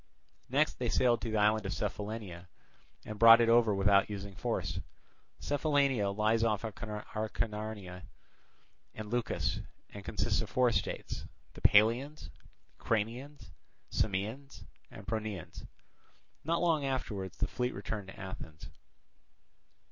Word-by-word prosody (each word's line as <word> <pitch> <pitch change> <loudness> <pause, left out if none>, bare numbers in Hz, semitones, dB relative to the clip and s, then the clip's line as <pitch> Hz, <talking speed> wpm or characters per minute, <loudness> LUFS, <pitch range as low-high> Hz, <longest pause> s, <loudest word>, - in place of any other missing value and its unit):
Next 145 +4 +2
they 120 -2 0
sailed 120 0 +3
to 115 - -3
the 110 - 0
island 105 0 +3
of 95 - -2
Cephallenia 100 -4 -4 0.6
and 110 -1 -7
brought 115 0 +10
it 115 -1 +3
over 115 -3 +5
without 100 +1 +4
using 100 -1 -6
force. - - -2 0.6
Cephallenia 140 -7 +1
lies 110 +3 +2
off 110 -2 +1
Acarnania 105 -2 -4 0.9
and 110 -1 -7
Leucas, 120 -1 -1 0.3
and 100 - -9
consists 85 - 0
of - - -6
four 125 -1 +3
states, - - -3 0.3
the - - -12
Paleans, 115 - +3 0.5
Cranians, 115 0 -2 0.4
Samaeans, 110 +8 -2 0.3
and 95 - -11
Pronaeans. 110 -5 -5 0.8
Not 165 +2 0
long 165 -4 +2
afterwards 105 -9 -3
the - - +1
fleet 125 +1 -2
returned 100 0 -5
to 95 - -11
Athens. 80 -5 -8
110 Hz, 120 wpm, -32 LUFS, 100-120 Hz, 0.9 s, brought